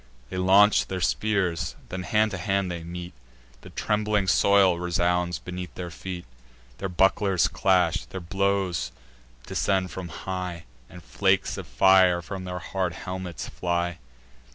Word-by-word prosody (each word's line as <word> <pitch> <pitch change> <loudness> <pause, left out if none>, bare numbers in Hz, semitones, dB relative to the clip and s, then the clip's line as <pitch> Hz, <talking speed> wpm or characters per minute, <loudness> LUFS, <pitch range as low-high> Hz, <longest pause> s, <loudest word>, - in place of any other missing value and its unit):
They 95 - -4
launch 95 +3 +5
their 95 - -3
spears; 90 -5 0
then 90 - -4
hand 110 +3 +2
to 100 - -4
hand 95 0 0
they 85 -1 -5
meet; 85 +1 -7 0.5
The - - -12
trembling 105 -1 0
soil 95 -1 +4
resounds 90 0 0
beneath 90 -2 -7
their 90 -1 -6
feet: 90 +1 -7 0.5
Their 95 - -3
bucklers 95 0 +3
clash; 90 -2 +2
thick 90 -3 -8
blows 95 -6 0 0.5
descend 95 -2 0
from 95 -2 -6
high, 90 0 -5 0.3
And 90 - -12
flakes 75 - +1
of - - -7
fire 90 +7 +5
from 95 +1 -6
their 90 0 -4
hard 90 0 -2
helmets 90 -2 -6
fly. 85 0 -2
90 Hz, 140 wpm, -26 LUFS, 85-95 Hz, 0.5 s, launch